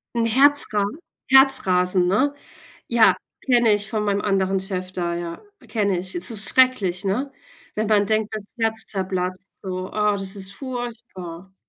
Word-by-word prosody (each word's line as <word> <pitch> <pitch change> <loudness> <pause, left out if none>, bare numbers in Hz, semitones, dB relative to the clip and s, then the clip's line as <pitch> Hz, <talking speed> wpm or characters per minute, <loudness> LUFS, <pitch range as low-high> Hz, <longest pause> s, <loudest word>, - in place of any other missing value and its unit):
'N 230 -1 +1
Herzra 260 -4 +3 0.5
Herzrasen, 185 -10 +5
ne? 265 +10 +1 0.6
Ja, 235 -2 +4 0.3
kenne 240 -4 +3
ich 205 +1 -1
von 215 -1 -2
meinem 200 0 -1
anderen 195 -1 0
Chef 185 -1 -5
da, 175 -2 -3
ja, 170 -1 -6 0.3
kenne 200 -5 0
ich. 185 +1 -5
Das 180 +5 +1
ist 215 -2 +2
schrecklich, 205 -8 +2
ne? 255 +9 -2 0.4
Wenn 215 0 -2
man 205 -2 +3
denkt, 215 0 -1
das 210 -2 -6
Herz 225 0 +1
zerplatzt 185 0 -4
so, 185 -1 -6
ah, 210 -1 +1
das 195 0 -3
ist 195 0 -4
furchtbar. 225 -9 -8
200 Hz, 155 wpm, -22 LUFS, 185-225 Hz, 0.6 s, Herzrasen